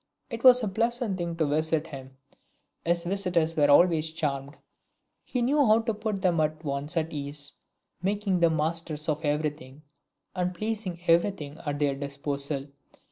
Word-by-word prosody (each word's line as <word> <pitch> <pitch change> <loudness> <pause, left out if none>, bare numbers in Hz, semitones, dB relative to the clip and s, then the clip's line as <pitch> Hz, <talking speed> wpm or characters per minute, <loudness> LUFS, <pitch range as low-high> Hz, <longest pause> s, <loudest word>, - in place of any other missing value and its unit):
It 230 0 -5
was 250 -1 +8
a - - +1
pleasant 230 0 -1
thing 170 -1 -2
to 165 -1 +1
visit 155 +2 +1
him; 135 -4 -10 0.7
his 170 0 +1
visitors 175 -3 0
were 145 -2 +3
always 160 +1 +5
charmed; 145 -3 -3 0.7
he 250 -2 -2
knew 285 +4 +3
how 220 -2 +5
to 225 0 -1
put 210 -2 -3
them 175 -3 +3
at 155 +1 -1
once 140 +3 -2
at 160 0 -1
ease, 145 0 -4 0.5
making 195 0 0
them 165 -2 +3
masters 155 -1 -2
of 155 0 -1
every 150 0 +1
thing, 140 0 -14 0.5
and 180 0 -1
placing 210 -4 -3
every 170 +4 +4
thing 155 -6 -8
at 145 0 -1
their 145 -1 +1
disposal. 140 0 -3
165 Hz, 165 wpm, -27 LUFS, 145-190 Hz, 0.7 s, was